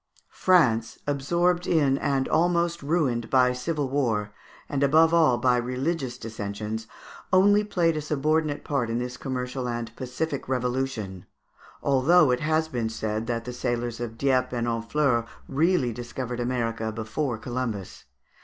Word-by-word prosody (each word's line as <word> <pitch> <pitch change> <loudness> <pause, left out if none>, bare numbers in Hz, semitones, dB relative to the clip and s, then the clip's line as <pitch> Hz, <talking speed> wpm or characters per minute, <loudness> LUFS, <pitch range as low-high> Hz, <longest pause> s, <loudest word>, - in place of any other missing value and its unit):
France, 120 -12 +3
absorbed 175 +6 +1
in, 145 -5 +3
and 135 -2 0
almost 170 0 +1
ruined 140 -7 0
by 125 -1 +4
civil 145 +3 -2
war, 115 -7 -1 0.3
and 140 -1 -2
above 160 +4 +5
all 155 -7 +5
by 125 0 +3
religious 130 +2 -2
dissensions, 110 0 -5 0.4
only 205 +3 +5
played 175 -5 +1
a 155 - -2
subordinate 150 +1 0
part 130 -6 -1
in 115 - -1
this 125 +1 -3
commercial 125 -1 -4
and 120 -1 -4
pacific 130 +3 -4
revolution, 125 -7 -2 0.6
although 140 +2 +4
it 125 - +1
has 155 +1 +1
been 120 -7 -2
said 110 0 -3
that 115 -1 -2
the 125 - -5
sailors 120 -1 -2
of 115 -2 -5
Dieppe 130 -1 +1
and 120 - 0
Honfleur 115 +1 0 0.2
really 140 -3 +2
discovered 125 +1 -5
America 115 -2 -1
before 115 +4 -3
Columbus. 120 -5 -5
130 Hz, 140 wpm, -26 LUFS, 120-150 Hz, 0.6 s, above